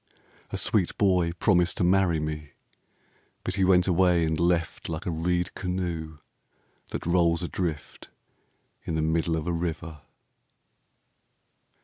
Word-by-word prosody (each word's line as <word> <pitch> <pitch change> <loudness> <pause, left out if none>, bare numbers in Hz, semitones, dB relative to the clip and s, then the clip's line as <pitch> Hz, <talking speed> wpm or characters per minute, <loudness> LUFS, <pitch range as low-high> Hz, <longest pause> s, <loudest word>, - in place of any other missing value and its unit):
A - - -3
sweet 95 -5 0
boy 90 -4 +3
promised 90 -1 +2
to - - +1
marry 90 -2 +3
me, 75 -1 -5 0.9
But 90 - -2
he 95 0 +1
went 90 -1 +5
away 90 -2 +3
and 80 -1 -1
left 85 -1 0
Like 80 0 -4
a 90 - -1
reed 90 +2 -1
canoe 85 -4 -3 0.7
that - - -5
rolls 85 -1 +2
adrift 85 -3 -4 0.7
In 80 - -3
the 80 - 0
middle 80 +1 +1
of 80 - -4
a 90 - -1
river. 80 -2 -4
85 Hz, 130 wpm, -27 LUFS, 80-90 Hz, 0.9 s, went